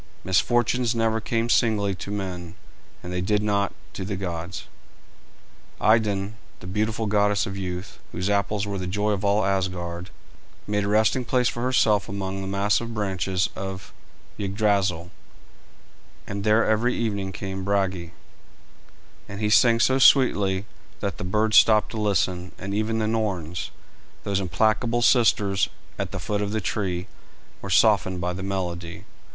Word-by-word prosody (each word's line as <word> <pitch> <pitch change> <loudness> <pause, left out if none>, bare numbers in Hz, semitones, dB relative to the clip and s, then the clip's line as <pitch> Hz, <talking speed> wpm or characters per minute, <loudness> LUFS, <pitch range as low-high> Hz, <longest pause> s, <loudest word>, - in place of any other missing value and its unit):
Misfortunes 120 +6 +2
never 115 -1 +1
come 115 +1 -1
singly 105 -4 +2
to 95 - -7
men, 90 -4 -5 0.5
and 90 - -6
they 90 - -1
did 105 +3 +1
not 100 -1 +1 0.2
to - - -5
the 100 +1 -3
gods. 90 -2 -5 1.1
Idun, 105 -1 +2 0.2
the - - -12
beautiful 110 +4 -1
goddess 105 -1 +2
of 95 - -5
youth, 90 0 -5
whose 90 +2 -3
apples 100 0 0
were 100 -1 -3
the 90 - -4
joy 105 +3 0
of 100 -1 -2
all 100 0 +2
Asgard, 90 -2 -2 0.6
made 105 -1 0
a - - -2
resting 110 +5 +2
place 125 0 +1
for 120 - -5
herself 115 -5 +2
among 95 -1 -4
the 95 - -5
massive 105 +4 0
branches 95 -2 -1
of 95 -1 -6 0.5
Yggdrasil, 100 -4 0 1.1
and 100 0 -5
there 110 +2 +4
every 115 +3 +2
evening 100 -4 -2
came 95 0 -5
Brage, 95 -3 0 1.2
and 105 +1 0
sang 115 -1 +5
so 130 +3 +3
sweetly 105 -8 +4 0.3
that 100 -2 -4
the - - -4
birds 105 +4 +2
stopped 110 -1 +5
to 110 - -3
listen, 90 -3 0
and 100 +1 -5
even 110 +2 0
the 110 - 0
Norns, 95 -7 -2 0.5
those 100 -1 0
implacable 110 +6 +1
sisters 105 -6 +3 0.3
at - - -2
the - - -4
foot 105 -1 -2
of 105 0 -2
the 110 - 0
tree, 95 -3 -2 0.6
were - - -6
softened 95 -1 +3
by 90 +1 -2
the 95 - -6
melody. 90 -3 -4
100 Hz, 150 wpm, -24 LUFS, 95-110 Hz, 1.2 s, sang